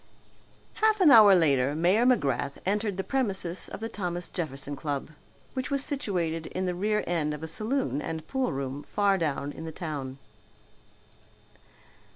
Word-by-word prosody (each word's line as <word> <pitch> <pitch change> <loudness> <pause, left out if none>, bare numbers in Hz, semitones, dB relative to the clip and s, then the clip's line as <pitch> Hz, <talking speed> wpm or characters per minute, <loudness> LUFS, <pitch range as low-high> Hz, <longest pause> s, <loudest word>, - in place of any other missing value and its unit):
Half 435 -1 +4
an 345 -6 +7
hour 215 -5 +9
later 140 -5 +2
Mayor 185 +9 +3
McGrath 140 - +1
entered 205 0 0
the 190 - -1
premises 190 -10 -1
of - - -8
the 225 - -2
Thomas 180 -5 -4
Jefferson 145 -4 -4
Club, 145 0 -4 0.4
which 260 -1 -3
was 280 -1 +1
situated 175 - -2
in 185 +1 -3
the 180 - -1
rear 210 +4 0
end 155 -3 -1
of 150 - -10
a - - -3
saloon 215 - -1
and 160 0 -5
pool 265 -1 -1
room 135 +1 -4
far 200 +3 +1
down 145 -3 -2
in 160 - -9
the 160 - -5
town. 145 -5 -5
175 Hz, 160 wpm, -28 LUFS, 150-215 Hz, 0.4 s, hour